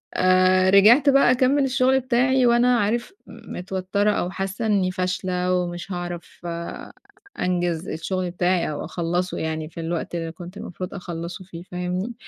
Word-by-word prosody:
آآ، 185 0 +4
رجعت 225 +9 +6
بقى 275 -2 +5
أكمّل 260 +3 +3
الشُغل 265 0 +3
بتاعي 255 +1 +2
وأنا 240 +1 +4
عارف 235 - -1 0.2
متوتّرة 190 +3 -2
أو 180 -3 -1
حاسّة 195 +4 -3
إنّي 195 -4 +2
فاشلة 185 0 -1
ومش 175 0 -3
هاعرف 175 -1 -6 1.0
أنجِز 175 -1 -1
الشُغل 180 +2 -3
بتاعي 180 0 +1
أو 145 - -5
أخلّصه 175 +1 -2
يعني 160 -1 -3
في 170 - -10
الوقت 170 +1 -3
اللي 165 -1 -3
كنت 175 +3 -10
المفروض 185 -1 -7
أخلّصه 175 0 -6
فيه 170 -2 -10
فاهمني؟ 180 +5 -4
185 Hz, 140 wpm, -23 LUFS, 175-215 Hz, 1.0 s, رجعت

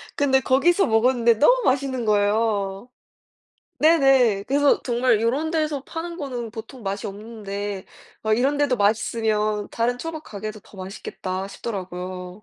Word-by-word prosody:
근데 265 -2 +3
거기서 335 +10 +3
먹었는데 235 +1 +3
너무 - - +4
맛있는 260 -3 0
거예요. 205 0 +1 0.9
네네. 270 -10 +4
그래서 285 +3 +3
정말 240 -2 +2
'요런 275 +8 0
데서 305 -4 -1
파는 335 +1 -6
거는 250 -7 -5
보통 230 +2 -9
맛이 195 +1 -3
없는데 205 -2 -6 0.4
막 220 0 +2
이런 275 +3 +2
데도 285 -4 +2
맛있으면 215 0 0
다른 245 +2 -1
초밥 320 +1 -6
가게도 215 0 -7
더 200 - -18
맛있겠다.' 185 0 -5
싶더라고요. 185 -2 -6
230 Hz, 315 characters per minute, -23 LUFS, 205-270 Hz, 0.9 s, 너무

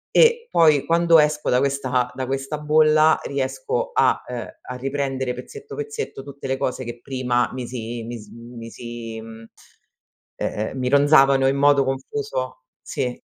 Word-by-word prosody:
e 470 0 +5
poi 155 - +4
quando 170 0 +5
esco 150 0 +1
da 125 - +4
questa 130 -2 0
da 130 0 -3
questa 135 +3 -3
bolla 155 +1 +4
riesco 475 - -2
a - - +3
uhm, 125 -1 -5
a 125 - -8
riprendere 135 -1 -2
pezzetto 430 - -9
pezzetto 440 - -5
tutte 140 -1 -8
le 135 - 0
cose 130 0 -2
che 120 0 -7
prima 125 -2 0
mi 125 -1 -5
si 120 -1 -5
mis 115 -2 -8
mi 115 0 -10
si 115 -1 -7
mhmm, 115 0 -11 0.9
ehm, 110 +5 -3
mi 125 - -1
ronzavano 140 -1 +5
in 135 +1 +1
modo 140 0 +5
confuso, 435 - -4 0.2
sì. 125 -4 -3
135 Hz, 155 wpm, -22 LUFS, 125-155 Hz, 0.9 s, e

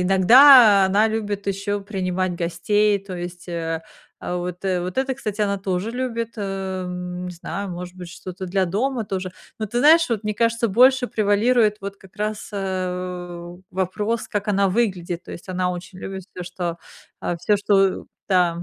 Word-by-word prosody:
иногда 205 +3 +8
она 205 +3 +3
любит 205 -2 -3
еще 200 +1 -2
принимать 185 -2 -2
гостей, 205 +5 +1
то 195 -1 -8
есть, 175 +1 -7
э 165 -1 -3 0.4
э, - - -4
вот 180 0 -5
вот 180 -1 -1
это, 265 0 +1
кстати, 215 -5 -3
она 200 -1 0
тоже 190 +2 -2
любит, 230 -2 -3
эм, 185 -3 -4
не - - -5
знаю, 195 +3 -5
может 180 0 -7
быть, 180 -1 -9
что-то 185 +2 -8
для 190 +1 +1
дома 230 +7 -1
тоже. 185 -2 -4 0.3
Ну, 215 - -2
ты 240 +4 -1
знаешь, 325 +4 +6
вот 225 -3 -2
мне 215 - 0
кажется, 230 +1 +1
больше 250 +5 +5
превалирует 215 +1 +2
вот 200 0 -5
как 190 -1 -19
раз, 210 0 -3
э, 180 -2 -4
у, 175 +1 -12
вопрос, 205 +5 -2
как 205 0 -3
она 200 -1 +3
выглядит, 180 -5 -1
то - - -9
есть 175 - -10
она 180 0 0
очень 180 +1 -8
любит 190 0 -6
всё, 180 - -5
что, 175 -1 -4 0.4
а, 175 - -2
всё, 205 +5 +2
что 195 -1 +2 0.2
да. 175 -3 +2
195 Hz, 175 wpm, -22 LUFS, 180-210 Hz, 0.4 s, иногда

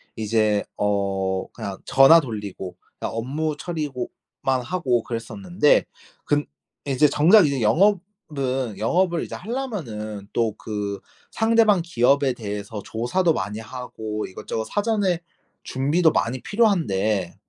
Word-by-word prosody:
이제 110 -1 +1
어 95 -2 0
그냥 100 -1 -6
전화 135 +5 +7
돌리고 105 - -6 0.2
그러니까 - - -4
업무 145 +6 -2
처리고 150 -8 -4 0.3
만 130 -1 +1
하고 125 -6 0
그랬었는데 150 - +1 0.4
근 145 0 +1 0.4
이제 140 +2 +4
정작 170 +8 +6
이제 140 -3 0
영업은 145 - 0
영업을 170 - +1
이제 - - -6
하려면은 135 - -5
또 115 -3 0
그 105 -2 -4 0.3
상대방 225 -5 +3
기업에 140 -3 +2
대해서 105 -2 -6
조사도 140 - 0
많이 105 -3 -3
하고 110 -3 -6
이것저것 110 +3 -5
사전에 205 - 0 0.4
준비도 150 +6 +2
많이 125 -1 -1
필요한데 110 - +1
130 Hz, 275 characters per minute, -23 LUFS, 105-170 Hz, 0.4 s, 전화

